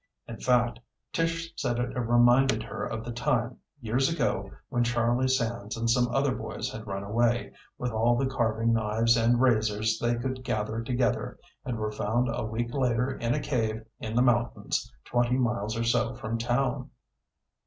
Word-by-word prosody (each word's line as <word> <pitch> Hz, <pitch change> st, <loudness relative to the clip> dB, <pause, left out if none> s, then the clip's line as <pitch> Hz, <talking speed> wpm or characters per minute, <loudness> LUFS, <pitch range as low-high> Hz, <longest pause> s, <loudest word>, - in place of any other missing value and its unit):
In 115 Hz, -, -8 dB
fact, 120 Hz, -2 st, +2 dB, 0.3 s
Tish 165 Hz, 0 st, -1 dB
said 120 Hz, -3 st, -1 dB
it 120 Hz, 0 st, -2 dB
reminded 120 Hz, 0 st, +4 dB
her 115 Hz, -, -5 dB
of 110 Hz, 0 st, -4 dB
the 120 Hz, -, -4 dB
time, 120 Hz, 0 st, 0 dB, 0.2 s
years 125 Hz, +5 st, +1 dB
ago, 165 Hz, -, -1 dB, 0.2 s
when 120 Hz, -, +1 dB
Charlie 120 Hz, +1 st, +1 dB
Sands 115 Hz, -4 st, -1 dB
and 115 Hz, 0 st, -1 dB
some 120 Hz, +1 st, +3 dB
other 135 Hz, +1 st, +1 dB
boys -, -, -4 dB
had 110 Hz, 0 st, -8 dB
run 100 Hz, 0 st, -3 dB
away, 120 Hz, +4 st, +1 dB, 0.2 s
with 125 Hz, 0 st, -2 dB
all 115 Hz, +2 st, +3 dB
the 135 Hz, -, +1 dB
carving 115 Hz, -3 st, +1 dB
knives 115 Hz, +1 st, +2 dB
and 120 Hz, +1 st, +3 dB
razors 110 Hz, -3 st, +2 dB
they 120 Hz, 0 st, +1 dB
could 130 Hz, +2 st, -4 dB
gather 110 Hz, 0 st, -2 dB
together, 125 Hz, +1 st, -1 dB, 0.3 s
and 125 Hz, -3 st, -3 dB
were 110 Hz, 0 st, -2 dB
found 115 Hz, +4 st, 0 dB
a -, -, -2 dB
week 115 Hz, +2 st, -3 dB
later 125 Hz, -1 st, +1 dB
in 115 Hz, +2 st, 0 dB
a -, -, 0 dB
cave 110 Hz, -6 st, -1 dB
in 110 Hz, 0 st, -5 dB
the 125 Hz, -, +5 dB
mountains 120 Hz, -2 st, 0 dB
twenty 120 Hz, +1 st, +1 dB
miles 120 Hz, -3 st, 0 dB
or 115 Hz, -, 0 dB
so 120 Hz, +1 st, +1 dB
from 115 Hz, +1 st, -3 dB
town. 125 Hz, +2 st, 0 dB
120 Hz, 175 wpm, -28 LUFS, 115-125 Hz, 0.3 s, the